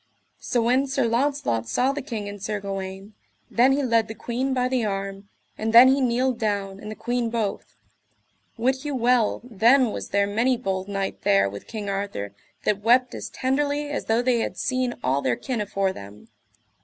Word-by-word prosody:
So 240 -2 0
when 255 +4 +2
Sir 270 -1 0
Launcelot 235 - 0
saw 255 - +2
the 290 +1 -4
king 225 -7 -5
and 205 -1 -8
Sir 205 +1 -2
Gawaine, 195 +1 -6 0.4
then 250 +3 +4
he 285 +1 0
led 230 -3 +2
the 220 - -7
queen 245 +5 -2
by 250 -1 +1
the 255 -2 0
arm, 195 -1 -4 0.3
and 220 +1 -1
then 245 +3 +10
he 270 +1 +3
kneeled 250 0 +1
down, 200 -3 -2
and 210 - -8
the 215 - -6
queen 240 0 -1
both. 225 -3 -3 0.8
Wit 260 +3 0
you 295 -2 -3
well 245 -2 +2
then 240 +2 +3
was - - -6
there 200 0 +2
many 230 +5 +1
bold 190 -5 -3
knight 195 -1 -3
there 100 0 +3
with 100 +1 -8
King 215 -3 -6
Arthur 195 - -3 0.3
that 205 -1 0
wept 245 +3 +3
as - - -6
tenderly 290 +2 -1
as 290 - -3
though 225 +2 +1
they 245 -2 +2
had - - -3
seen 255 -1 -1
all 135 +2 +1
their 125 -3 +1
kin 245 - -3
afore 195 -2 -1
them. 100 - -12
230 Hz, 190 wpm, -24 LUFS, 200-255 Hz, 0.8 s, then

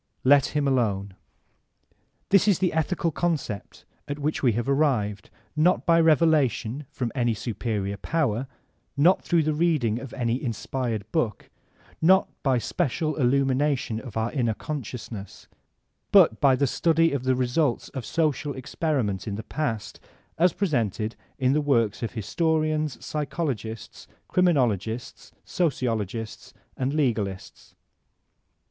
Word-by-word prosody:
Let 140 +1 +5
him 145 -1 +1
alone. 100 -7 0 1.2
This 200 +1 +4
is 200 -5 +4
the 185 -2 0
ethical 160 +1 0
concept 150 -11 -3 0.2
at 145 - -4
which 150 +1 -2
we 125 -4 +3
have 120 +3 -2
arrived, 130 -8 0 0.3
not 170 +4 +3
by 165 0 +5
revelation 150 -5 +2
from 120 -3 -3
any 120 -4 +1
superior 105 -3 -3
power, 135 - -1 0.5
not 170 +7 +4
through 170 -2 +2
the 155 0 0
reading 150 -9 +1
of 135 -2 -8
any 120 0 -1
inspired 115 -3 -3
book, 125 -10 -2 0.5
not 190 +4 +5
by 135 -3 +2
special 155 - -1
illumin 135 0 +2
ation 135 -6 0
of 120 -2 -8
our 110 +1 0
inner 120 -6 0
consciousness; 115 -8 -7 0.6
but 110 - +6
by 135 -2 +5
the 140 - +1
study 165 +4 +2
of 140 -3 -2
the 130 0 +2
results 125 +2 0
of 130 - -6
social 150 +1 -1
experiment 130 - -2
in 100 - -2
the 110 - -6
past 115 -6 -3 0.4
as 180 +2 +4
presented 115 - -1 0.2
in 130 -1 +2
the 150 - +2
works 115 -7 +1
of 115 - -3
historians, 155 - -1
psychologists, 140 -8 -4 0.2
criminologists, 120 - 0
sociologists 115 - -2 0.2
and 130 +1 -1
legalists. 110 -10 -2
130 Hz, 130 wpm, -25 LUFS, 115-155 Hz, 1.2 s, but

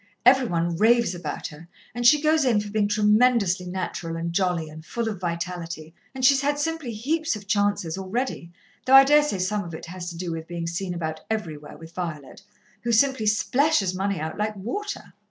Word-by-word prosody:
Every 255 0 +6
one 170 -2 -1
raves 230 0 +4
about 170 -4 -5
her, 155 +3 -13 0.3
and 240 0 +2
she 300 +3 +7
goes 310 0 +3
in 240 -5 +3
for 205 0 -5
being 210 -1 +1
tremendously 210 -3 +3
natural 180 -2 -4
and 170 0 -3
jolly 180 -3 0
and 155 +1 -11
full 230 +8 -3
of 210 -5 -4
vitality 170 -2 -4 0.2
and 260 -1 0
she's 275 +1 +5
had 290 +1 0
simply 315 -3 -2
heaps 305 +7 -1
of 205 -1 -9
chances, 200 -4 0
already, 190 -2 -3 0.4
though 265 - +7
I 270 - +11
daresay 295 -5 +3
some 200 +3 -1
of 170 -3 -7
it - - -8
has 175 0 -6
to 170 - -8
do 175 -1 -4
with 160 0 -5
being 170 -1 -5
seen 175 +2 -3
about 160 -2 -4
everywhere 160 -9 -4
with 165 0 -13
Violet, 165 -6 -6 0.4
who 235 - -1
simply 230 -1 +3
splashes 215 - +2
money 195 -1 -1
out 155 +5 -5
like 215 0 -1
water. 335 - -5
200 Hz, 195 wpm, -24 LUFS, 170-240 Hz, 0.4 s, I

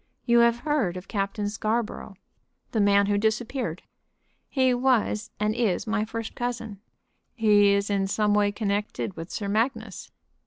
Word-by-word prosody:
You 235 -1 +4
have 235 0 +3
heard 275 - 0
of 180 - -9
Captain 205 0 -2
Scarborough?" 215 -1 -3 0.6
"The 225 - 0
man 200 0 +4
who 205 0 +1
disappeared?" 220 - -2 0.7
"He 260 -2 +2
was 245 -3 +1
and 210 0 +1
is 220 -6 0
my 220 -1 0
first 225 0 -5
cousin." 235 -4 -4 0.6
"He 205 -3 +5
is 200 0 +1
in 195 -1 +1
some 210 +1 +1
way 205 -1 +3
connected 205 -2 -2
with 165 +2 -7
Sir 205 - -4
Magnus." 220 0 -2
215 Hz, 150 wpm, -26 LUFS, 200-235 Hz, 0.7 s, He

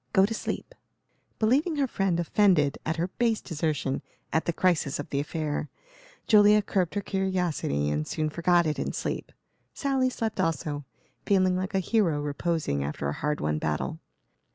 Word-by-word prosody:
Go 190 - +6
to 220 - -2
sleep." 365 - -4 0.6
Believing 275 +9 +2
her 285 -2 +2
friend 195 -8 0
offended 170 -5 +3
at 160 - 0
her 170 +2 -1
base 230 -2 +2
desertion 150 -5 -2 0.3
at 160 - +2
the - - +1
crisis 165 -5 +1
of 145 - -5
the 140 - 0
affair, 150 0 -2 0.6
Julia 210 -1 +6
curbed 185 -2 0
her 205 - 0
curiosity 180 - -1
and 75 +1 -1
soon 155 -1 -1
forgot 170 +1 +3
it 155 -1 -1
in - - -2
sleep. - - -3 0.4
Sally 270 -2 +1
slept 225 -3 -3
also, 150 -3 -1 0.4
feeling 185 -2 +3
like 190 +2 -2
a - - +4
hero 185 -6 +1
reposing 145 - -1
after 70 0 -3
a - - -2
hard 150 - -2
won 75 0 0
battle. 80 - -2
170 Hz, 165 wpm, -27 LUFS, 150-205 Hz, 0.6 s, Go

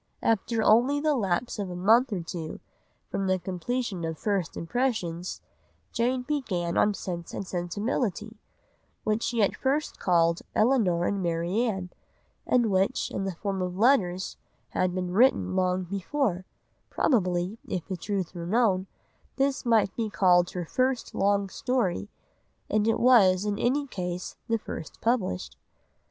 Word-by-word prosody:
After 225 +1 +1
only 245 +7 +4
the 305 +1 +2
lapse 210 +1 -1
of 200 -2 -3
a 180 - -5
month 225 +8 +4
or 190 -4 -1
two 165 -2 -6 0.5
from 195 - -1
the 185 0 +2
completion 190 +2 -3
of 160 -1 -3
First 195 -4 -1
Impressions, 180 -4 -2 0.5
Jane 250 +2 0
began 205 - -2
on 210 -1 +3
Sense 170 -3 -6
and 195 - -4
Sensibility, 210 +4 -2 0.6
which 215 +1 0
she 235 -2 +1
at 200 - +1
first 280 +3 -1
called 170 -2 +2
Elinor 215 -8 +3
and 200 +1 0
Marianne, 180 +3 -1 0.6
and 240 -4 +3
which, 190 +1 +1
in 195 - -2
the 190 -2 -3
form 195 +1 -3
of 180 0 -3
letters, 195 -6 +2 0.3
had 185 -1 0
been 180 -1 -2
written 240 -3 +3
long 185 0 +1
before; 195 - -2 0.4
probably, 185 - +1
if 175 -3 -3
the 190 - -3
truth 190 -1 -3
were 170 -2 -6
known, 195 -3 +2 0.5
this 270 -2 0
might 220 -4 +3
be 225 -2 -1
called 175 -2 +4
her 180 -2 -4
first 255 +7 -1
long 200 0 +2
story, 190 - -1 0.6
and 215 +1 +2
it 225 - +2
was 205 -6 +5
in 205 -1 -1
any 280 +4 +1
case 180 -7 -5
the 230 - +2
first 185 - -8
published. 185 - -1
195 Hz, 145 wpm, -27 LUFS, 180-235 Hz, 0.6 s, was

